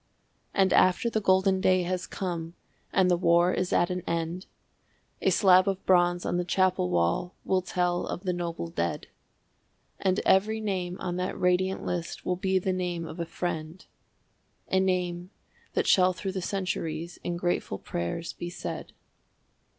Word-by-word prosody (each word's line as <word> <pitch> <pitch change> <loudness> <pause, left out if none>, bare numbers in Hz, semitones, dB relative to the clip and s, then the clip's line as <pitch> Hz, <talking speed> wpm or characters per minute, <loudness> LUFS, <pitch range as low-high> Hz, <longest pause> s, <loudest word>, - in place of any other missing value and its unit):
And 190 -1 +3
after 185 +6 +4
the 220 - 0
golden 190 0 +3
day 185 -1 +3
has 180 +1 -2
come 170 -3 -4 0.4
and 185 -1 +3
the - - +5
war 175 +1 +3
is 185 - -1
at 175 +1 +2
an 180 0 -2
end, 170 +2 -2 0.7
A - - +3
slab 185 -2 +5
of 195 -1 -2
bronze 175 -1 +3
on - - 0
the 180 - 0
chapel 185 - +1
wall 85 - 0
will 190 -1 +2
tell 180 -1 -1
of 180 - -5
the 180 -2 0
noble 170 - -3
dead. 85 0 -2 0.9
And 185 0 +1
every 215 +3 +3
name 185 -4 -2
on 180 -1 -3
that 180 +1 -3
radiant 180 +1 +1
list 175 -1 -4
will 180 - +1
be 190 +1 +1
the 185 0 0
name 175 -2 -2
of 160 +2 -8
a 170 - -2
friend, 165 0 -4 0.9
A 190 - +4
name 180 -1 -1 0.4
that - - +1
shall 185 -1 +5
through 190 +1 -4
the 190 0 -3
centuries 170 -3 -3
in 175 -1 -2
grateful 175 - -1
prayers 85 - -4
be 175 - -6
said. 175 - -6
180 Hz, 165 wpm, -28 LUFS, 175-185 Hz, 0.9 s, the